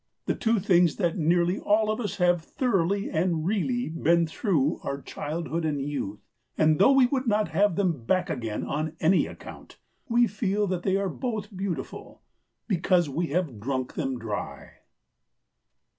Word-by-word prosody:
The - - +1
two 225 0 +1
things 180 -4 +3
that 175 -5 0
nearly 175 +2 +2
all 215 +1 +2
of 215 - -3
us 205 -2 -3
have 175 -2 +3
thoroughly 200 -1 0
and 165 -2 0
really 230 +6 0
been 165 +1 +2
through 160 - 0
are 140 - -4
childhood 165 +4 -4
and 150 -2 -1
youth. 135 -8 -4 0.3
And 155 0 +3
though 200 +8 +6
we 270 -2 +6
would 260 0 -1
not 210 -1 +2
have 205 -3 +2
them 170 -10 0
back 185 +5 +1
again 115 -3 -3
on 155 +2 -3
any 180 +4 +3
account, - - -11 0.3
we 240 +1 +4
feel 210 -1 -1
that 185 -2 -2
they 190 +1 +1
are 200 0 -1
both 210 0 -4
beautiful, 190 -2 -5 0.4
because 175 -4 +2
we 165 +5 -1
have 155 - -2
drunk 130 +2 -3
them 135 -1 -2
dry. 110 -3 -5
175 Hz, 160 wpm, -26 LUFS, 155-205 Hz, 0.4 s, though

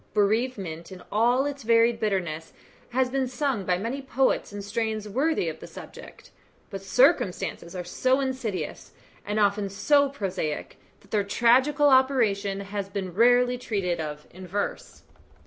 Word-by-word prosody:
Bereavement 200 -6 0
in 185 -1 -10
all 240 +5 +3
its 285 -1 -4
varied 230 0 +3
bitterness 175 -7 -2 0.4
has 250 +1 0
been 265 -1 0
sung 255 -5 -2
by 180 -1 +1
many 235 +8 -3
poets 265 -3 0
in 205 0 -6
strains 215 0 -2
worthy 265 - 0
of 160 -1 -4
the - - -10
subject; - - -12 0.4
but 195 -1 -5
circumstances 195 - +1
are 180 - -4
so 255 +9 +1
insidious, 260 -7 -4 0.3
and 210 +1 0
often 200 -1 +2
so 280 +8 +3
prosaic, 190 - -4 0.2
that 200 - -23
their 210 -2 +2
tragical 260 +8 +3
operation 225 -7 +2
has 200 0 -5
been 190 -2 -4
rarely 245 +4 +4
treated 195 -8 -2
of 150 -1 -5
in 185 +1 -10
verse. 200 +3 -4
215 Hz, 145 wpm, -26 LUFS, 195-255 Hz, 0.4 s, rarely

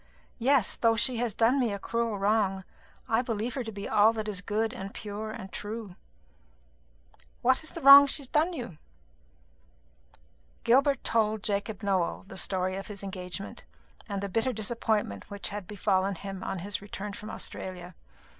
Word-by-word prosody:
Yes, 255 -2 +3
though 230 -1 +3
she 240 +3 +4
has 230 -3 -1
done 240 +4 +3
me 240 -4 +1
a 200 - -3
cruel 230 +1 -2
wrong, 200 -1 +1 0.4
I 225 +1 +2
believe 230 -1 -3
her 260 - -3
to 225 - -6
be 200 -1 -6
all 215 +2 +5
that 220 -1 -4
is 200 -3 -3
good 215 +2 -1
and 195 +1 -7
pure 210 +1 -5
and 215 -4 -8
true." 210 -3 -6 1.5
"What 260 +1 +4
is 315 - -5
the - - -8
wrong 280 +1 +11
that - - -4
she 290 - +3
has - - -5
done 310 +7 +2
you?" 240 - -7 1.8
Gilbert 275 +3 +3
told 220 -2 +1
Jacob 205 0 -2
Nowell 190 -4 0
the - - -10
story 185 -1 0
of 195 - -6
his 200 -2 -8
engagement, 190 0 -6 0.5
and 200 -1 -3
the - - -1
bitter 225 +6 0
disappointment 215 - -1
which 200 0 -4
had 205 -3 -6
befallen 195 -1 0
him 195 +1 -7
on 195 - -3
his 200 +4 -4
return 205 0 -6
from 210 +2 -8
Australia. 180 -3 -6
210 Hz, 175 wpm, -28 LUFS, 195-230 Hz, 1.8 s, wrong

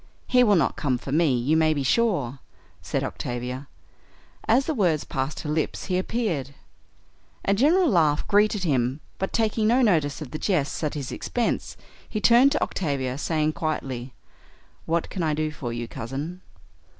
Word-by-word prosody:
"He 250 -1 +4
will 210 -4 +5
not 160 -6 +1
come 130 -4 0
for 135 - -7
me, 150 -3 +3
you 130 +6 +1
may 155 -1 +3
be 140 - -1
sure," 140 - +1 0.4
said - - -2
Octavia. 125 +3 -4 0.8
As 250 +5 +4
the 320 - -1
words 175 - +1
passed 135 0 -3
her 150 - -5
lips 155 -1 -1
he 180 -2 0
appeared. 175 - -2 0.9
A 200 - +3
general 320 - +4
laugh 160 - +2
greeted 210 -1 +3
him, 130 -4 +1 0.2
but, 190 - -2
taking 220 -1 +1
no 250 +3 +4
notice 155 - +2
of 150 -5 -8
the 155 - -5
jests 165 -6 0
at 150 - -1
his 140 -4 -4
expense, 240 -1 -2 0.3
he 215 - -2
turned 240 +5 +6
to - - +1
Octavia, 135 -7 -2
saying 155 -1 0
quietly, 130 -6 -4 0.7
"What 165 0 0
can 185 - -3
I 155 -2 +1
do 155 0 -1
for 125 -5 -5
you, 120 0 -4
Cousin?" 140 +11 -6
155 Hz, 170 wpm, -25 LUFS, 135-205 Hz, 0.9 s, turned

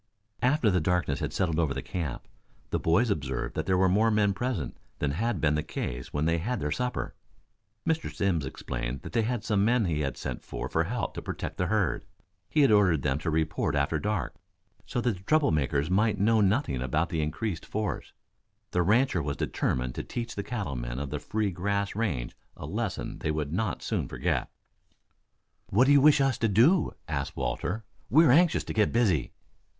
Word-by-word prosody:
After 125 -3 +3
the 90 -2 +2
darkness 90 -4 0
had - - -2
settled 85 -3 0
over 75 -5 +1
the - - -4
camp, 80 -8 -4 0.4
the - - +1
boys 100 +8 +3
observed 65 -8 -2
that 80 - -3
there 95 -1 +3
were 95 +1 +4
more 105 +5 +3
men 105 -2 +3
present 125 +3 -3 0.2
than 75 - 0
had 110 +5 -1
been 75 -1 +2
the 75 - +1
case 60 -4 -5
when 75 +1 0
they 85 +1 +2
had 120 +9 -2
their 75 0 -2
supper. 125 +7 -2 0.7
Mr. 160 -1 0
Simms 90 -6 0
explained 65 -1 -4
that - - -8
they 115 - +3
were 120 -3 -1
some 105 -2 +1
men 115 0 +3
he 80 -4 0
had 70 -2 -2
sent - - -5
for - - -5
to - - +1
help - - -3
protect - - -5
the 90 - 0
herd. 100 -4 +1 0.5
He 155 - +3
had 135 -5 +5
ordered 90 -9 +4
them 70 0 +1
to 80 - -2
report 80 -1 0
after 70 +2 +1
dark, 105 +1 -2 0.5
so 120 - -1
that 120 -5 0
the 90 - -15
trouble 155 - +3
makers 75 +1 0
might 105 +2 +3
know 110 +2 +4
nothing 100 - +1
about 75 +6 0
the 80 - -1
increased 80 +4 -2
force. 105 -1 -3 0.6
The 90 - +2
rancher 105 +1 +3
was 70 -1 -3
determined 65 -1 -1
to - - -4
teach 120 -1 -5
the 100 - -3
cattle 100 - -4
men - - -4
of 70 0 -4
the 75 - -2
free 105 +6 -1
grass 100 +3 -1
range 85 - -2 0.2
a - - -7
lesson - - -3
they - - -2
would 75 -1 -2
not 100 +1 -1
soon - - -1
forget. - - -1 1.2
"What 115 +7 +4
do 140 - +4
you 140 -1 +7
wish 150 0 +6
us 135 -2 +1
to 115 - +2
do?" 125 - +4
asked - - -3
Walter. 110 +5 -2 0.3
"We 160 +6 +6
are 125 - +6
anxious 170 +4 +4
to - - -5
get 105 -2 +2
busy." 100 - +1
95 Hz, 200 wpm, -28 LUFS, 75-115 Hz, 1.2 s, you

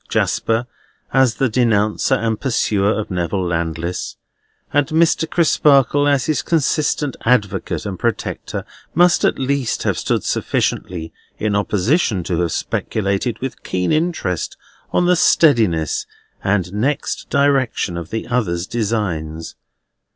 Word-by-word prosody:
Jasper 115 +2 0 0.5
as 130 -4 +4
the 135 - +1
denouncer 110 +1 +2
and 115 -2 -1
pursuer 105 -6 +1
of 110 -1 -3
Neville 90 +1 -1
Landless, 85 0 -3 0.6
and 145 -1 +3
Mr. 160 0 +2
Crisparkle 145 -4 +3
as 140 -2 +2
his 150 -5 0
consistent 150 -3 0
advocate 105 -6 0
and 95 -3 -5
protector, 115 -1 -3 0.3
must 175 +1 +4
at - - +2
least 135 -2 -1
have - - 0
stood - - 0
sufficiently 80 -3 -2 0.2
in 105 -1 -1
opposition 105 - +1
to 85 0 -2
have 85 -2 0
speculated 105 - -1
with 130 0 -5
keen 90 -1 -1
interest 155 - -1 0.3
on 175 - +2
the 180 0 +4
steadiness 110 - +3 0.4
and 95 -2 0
next 130 +8 -2
direction 135 -9 +1
of 85 -1 -6
the 110 +1 -3
other's 100 -9 -1
designs. 95 -8 -3
110 Hz, 125 wpm, -19 LUFS, 95-140 Hz, 0.6 s, as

